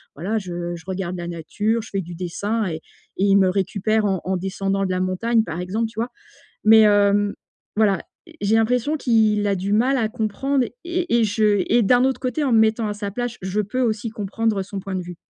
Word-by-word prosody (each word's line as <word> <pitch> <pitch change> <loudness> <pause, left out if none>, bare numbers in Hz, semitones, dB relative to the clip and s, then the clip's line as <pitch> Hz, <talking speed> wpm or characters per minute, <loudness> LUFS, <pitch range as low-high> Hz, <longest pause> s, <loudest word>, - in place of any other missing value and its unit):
voilà, 195 +9 -2
je 175 -3 -4
je 165 - -11
regarde 185 -1 -3
la 175 0 -5
nature, 205 +7 -1
je 215 - -11
fais 195 - -1
du 175 -1 -9
dessin 200 +6 -2
et 160 -2 -4 0.4
et 190 - 0
il 200 0 +5
me 190 -1 +4
récupère 200 +3 0
en 195 -2 +1
en 190 +1 0
descendant 195 +1 -1
de 185 - -2
la 185 - 0
montagne, 220 +5 +1
par 170 +1 -4
exemple. 210 +6 -1
Tu 220 0 -9
vois? 235 +2 -1 0.5
Mais, 220 +1 +7
hem, 205 0 +3 0.4
voilà, 205 -3 +4 0.3
e - - -14
j'ai 205 +2 +2
l'impression 245 +6 +2
qu'il 220 -5 +2
a 200 - +1
du 195 +2 -2
mal 255 +6 +3
à 225 -3 +1
comprendre 245 +4 -1 0.2
et 345 -8 0
et 225 - +3
je 210 -1 +2
et 240 - +4
d'un 245 +5 +4
autre 265 0 -1
côté, 265 +4 -1
en 260 - +1
me 225 - +6
mettant 220 0 +2
à 210 - -2
sa 205 -1 -5
place, 245 +2 -3
je 190 +2 -2
peux 210 +6 -3
aussi 225 -1 0
comprendre 215 0 -1
son 200 +1 -6
point 195 0 -5
de 185 - -2
vue. 175 0 -9
205 Hz, 225 wpm, -22 LUFS, 190-225 Hz, 0.5 s, Mais